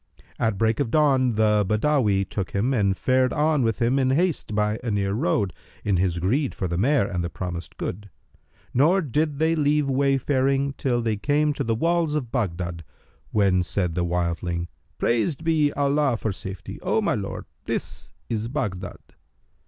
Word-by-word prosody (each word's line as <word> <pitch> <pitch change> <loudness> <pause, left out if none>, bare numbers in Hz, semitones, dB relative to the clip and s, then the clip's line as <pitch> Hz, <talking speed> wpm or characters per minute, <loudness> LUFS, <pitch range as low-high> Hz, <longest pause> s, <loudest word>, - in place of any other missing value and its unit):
At 110 -3 +1
break 110 +1 +1
of 140 -5 0
dawn, 130 -4 +3
the 105 -1 +3
Badawi 105 -2 +1
took 95 -1 -4
him 115 +7 +1
and 100 -5 +1
fared 130 0 +2
on 150 -1 +2
with 115 -2 0
him 125 +3 +2
in 130 -1 +2
haste 155 - 0
by 105 +1 +1
a 120 - -2
near 100 -2 0
road, 100 -2 0 0.3
in 100 -3 +1
his 90 -1 +1
greed 125 - 0
for 95 - -2
the 85 - -2
mare 125 +6 +3
and 90 -3 -2
the 85 - -2
promised 85 0 -6
good; 100 +2 -5 0.6
nor 170 +9 +4
did 150 +1 0
they 160 +2 +2
leave 150 -1 +2
wayfaring 135 0 +1
till 120 -3 -1
they 110 -2 0
came 150 +6 +1
to - - -2
the 115 0 0
walls 165 +3 +1
of 130 -6 -3
Baghdad, 85 -7 -2 0.5
when 95 -3 +3
said 90 -1 -1
the 90 +1 0
wildling, 85 0 -2 0.3
"Praised 130 +7 0
be 155 -3 +2
Allah 140 -3 +1
for 110 - -2
safety! 95 -2 -7
O - - +1
my - - +1
lord, - - -4 0.2
this - - -4 0.2
is 110 -1 -2
Baghdad." 115 -8 -3
115 Hz, 175 wpm, -24 LUFS, 100-140 Hz, 0.6 s, nor